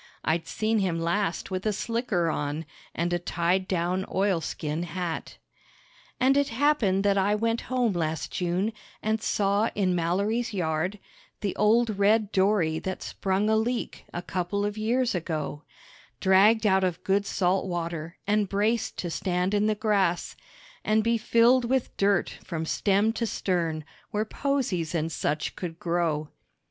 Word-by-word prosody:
(I'd 165 +1 0
seen 220 0 0
him 180 -4 0
last 170 +2 -1
with 185 0 -2
a 215 - +1
slicker 215 -4 -1
on 150 +2 -3 0.3
and 175 +2 0
a 175 - +1
tied 175 +2 0
down 180 +1 0
oilskin 170 -5 -1
hat.) 175 -1 -4 0.8
And 265 +2 +4
it 285 0 +3
happened 230 -7 +2
that 200 -1 +3
I 200 +2 +2
went 230 +2 0
home 250 -4 +1
last 160 -2 -2
June, 180 +4 -1 0.3
and 220 0 0
saw 205 +2 +1
in 190 -3 +1
Mallory's 200 +7 0
yard 175 +2 -1 0.4
The 200 -3 -2
old 215 0 +3
red 210 +1 +3
dory 190 -5 +2
that 185 +2 -4
sprung 195 +2 -1
a 220 - +3
leak 235 +2 -2
a 175 - -5
couple 185 +3 -2
of 205 0 -2
years 235 +3 +1
ago, 155 -4 -3 0.6
Dragged 210 +4 +5
out 190 -2 +4
of 180 -3 -1
good 200 +1 +1
salt 190 +1 +1
water 170 -2 -4
and 205 -1 +1
braced 215 +3 0
to 175 - -3
stand 180 +2 -1
in 205 +1 +2
the 215 - +2
grass 200 -5 +1 0.5
And 215 0 +2
be 230 +1 +2
filled 240 +3 +4
with 260 +1 0
dirt 200 -2 +1
from 160 -1 -4
stem 205 +6 +2
to 230 0 -1
stern, 165 -7 -1 0.2
where 210 +1 -1
posies 215 - -1
and 165 0 -1
such 150 0 -2
could 165 -3 -5
grow. 165 -3 -1
195 Hz, 155 wpm, -27 LUFS, 175-215 Hz, 0.8 s, Dragged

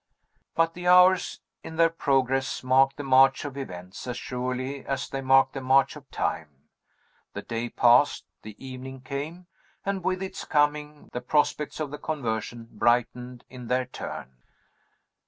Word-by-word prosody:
But 165 0 +2
the 180 +1 -6
hours, 180 +1 +5 0.2
in 160 - -8
their 165 0 +4
progress, 135 -4 0
mark 135 +1 +4
the 145 - -6
march 135 +1 +4
of 140 -2 -6
events 90 -7 -8
as 125 -1 -4
surely 130 +2 -4
as 135 - -3
they 135 - -4
mark 135 0 +4
the 135 - -6
march 135 +2 +3
of 145 -2 -13
time. 80 - -2 0.8
The - - -6
day 115 +1 -4
passed, 120 +5 +4 0.2
the 105 -1 -10
evening 130 0 -9
came 145 +7 -6 0.4
and, 195 -2 -2
with 185 +1 -1
its 190 - -6
coming, 150 0 0
the 125 - -3
prospects 150 +3 0
of 150 -3 -3
the 150 - -7
conversion 115 -5 -4
brightened 125 +1 0
in 125 -2 -10
their 125 +1 +1
turn. 65 - -8
135 Hz, 155 wpm, -26 LUFS, 125-150 Hz, 0.8 s, hours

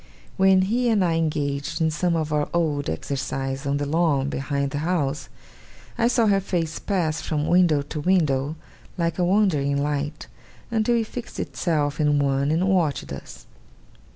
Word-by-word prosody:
When 190 -1 +4
he 240 +5 +1
and 205 -5 +3
I 170 - +1
engaged 145 -3 -1
in 160 -1 +2
some 170 +2 0
of 155 -2 -1
our 150 -1 0
old 150 -4 0
exercises 135 - -3
on 140 +1 +1
the 145 - -2
lawn 145 -3 +1
behind 140 0 -2
the 145 - -2
house, 155 -3 -1 0.7
I 235 -1 +2
saw 240 -1 +3
her 200 -2 +3
face 170 -5 -2
pass 170 -6 -1
from 150 -2 -2
window 170 -5 +3
to 150 +2 -6
window, 150 -4 +1 0.4
like 170 0 -1
a - - +3
wandering 175 -8 +2
light, 145 +1 -3 0.5
until 225 +1 +2
it 230 -1 +1
fixed 240 +2 -8
itself 150 -4 -1
in 150 -1 +3
one, 140 0 +1
and 165 +5 +1
watched 175 -7 0
us. - - -10
155 Hz, 165 wpm, -24 LUFS, 145-185 Hz, 0.7 s, When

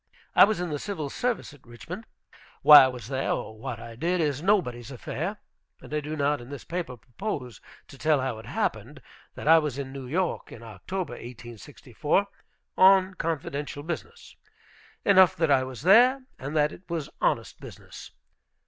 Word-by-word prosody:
I - - +9
was 215 -2 -1
in 175 -2 -3
the 145 - -3
Civil 160 -8 -5
Service 245 -10 -2
at 145 - -18
Richmond. 170 - -9 0.6
Why 145 -1 +10
I - - +2
was 125 -4 -7
there, 135 +1 -2
or 110 - -5
what 115 0 -6
I 115 0 -10
did, 175 +8 -1
is 145 -3 0
nobody's 150 - 0
affair. 160 - -5 0.4
And - - -12
I 150 - +1
do 150 +1 -5
not 145 -2 0
in 120 - -12
this 140 -3 -8
paper 170 -7 -5
propose 125 - -6 0.3
to 135 - -14
tell 155 -2 +2
how 130 -4 -3
it 110 - -12
happened - - -3 0.3
that - - -7
I 165 +1 +8
was 150 -4 -3
in 135 -1 -6
New 135 -2 -7
York 175 +6 -2
in 115 - -11
October, 140 - -5
1864, 120 - -3 0.5
on 190 0 +5
confidential 145 -4 -4
business. 315 - -7 0.7
Enough 190 -2 +6
that 165 -4 +1
I 130 -2 +4
was 130 0 -8
there, 250 +8 +5
and 140 +4 -6
that 150 0 +3
it - - -12
was 165 -4 -3
honest - - 0
business. - - -11
145 Hz, 175 wpm, -26 LUFS, 130-180 Hz, 0.7 s, Why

